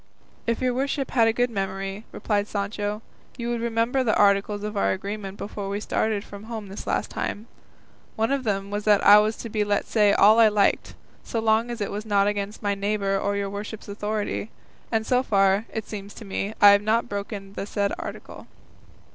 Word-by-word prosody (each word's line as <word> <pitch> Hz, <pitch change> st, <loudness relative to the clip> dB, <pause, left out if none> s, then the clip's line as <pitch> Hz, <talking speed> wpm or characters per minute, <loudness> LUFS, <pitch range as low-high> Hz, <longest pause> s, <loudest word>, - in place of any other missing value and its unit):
"If 230 Hz, +1 st, 0 dB
your 250 Hz, -1 st, +2 dB
worship 275 Hz, +2 st, -2 dB
had 230 Hz, -3 st, +4 dB
a -, -, +4 dB
good 245 Hz, +1 st, 0 dB
memory," 195 Hz, +1 st, -4 dB
replied 205 Hz, -1 st, -1 dB
Sancho, 205 Hz, +1 st, -3 dB, 0.3 s
"you 235 Hz, -1 st, -3 dB
would 235 Hz, -1 st, -2 dB
remember 235 Hz, +3 st, +1 dB
the 225 Hz, -, +2 dB
articles 205 Hz, 0 st, +3 dB
of 210 Hz, 0 st, -4 dB
our 200 Hz, -, +2 dB
agreement 200 Hz, +1 st, -6 dB
before 200 Hz, -1 st, -5 dB
we 200 Hz, +1 st, -2 dB
started 210 Hz, -1 st, -1 dB
from 205 Hz, 0 st, -11 dB
home 220 Hz, -3 st, -6 dB
this 195 Hz, -, -8 dB
last -, -, -1 dB
time; 210 Hz, -, -4 dB, 0.7 s
one 225 Hz, +3 st, 0 dB
of 275 Hz, -1 st, 0 dB
them 200 Hz, -3 st, -2 dB
was 205 Hz, 0 st, -2 dB
that 210 Hz, -2 st, +4 dB
I 205 Hz, +1 st, +9 dB
was 215 Hz, +1 st, +1 dB
to -, -, -6 dB
be 210 Hz, -1 st, 0 dB
let 205 Hz, -1 st, 0 dB
say 210 Hz, -2 st, +3 dB
all 215 Hz, +3 st, +6 dB
I 225 Hz, -, +8 dB
liked, 210 Hz, -1 st, +1 dB, 0.3 s
so 230 Hz, -, -3 dB
long 220 Hz, +1 st, +2 dB
as 240 Hz, -2 st, -5 dB
it 205 Hz, -, -2 dB
was 205 Hz, +1 st, -4 dB
not 200 Hz, -1 st, +3 dB
against 205 Hz, +1 st, -3 dB
my 205 Hz, 0 st, +1 dB
neighbour 200 Hz, -1 st, 0 dB
or 200 Hz, +1 st, -1 dB
your 200 Hz, -1 st, -2 dB
worship's 210 Hz, +2 st, -7 dB
authority; 210 Hz, +1 st, -3 dB, 0.4 s
and 220 Hz, -1 st, 0 dB
so 250 Hz, +1 st, +2 dB
far, 195 Hz, -3 st, +2 dB
it 220 Hz, -2 st, -4 dB
seems 200 Hz, -1 st, -8 dB
to 225 Hz, -, -10 dB
me, 200 Hz, +2 st, -3 dB
I 205 Hz, 0 st, +9 dB
have 200 Hz, 0 st, +5 dB
not 220 Hz, +3 st, +1 dB
broken 200 Hz, -1 st, -6 dB
the 200 Hz, -, -5 dB
said 200 Hz, -1 st, -1 dB
article." -, -, -8 dB
210 Hz, 205 wpm, -25 LUFS, 200-225 Hz, 0.7 s, I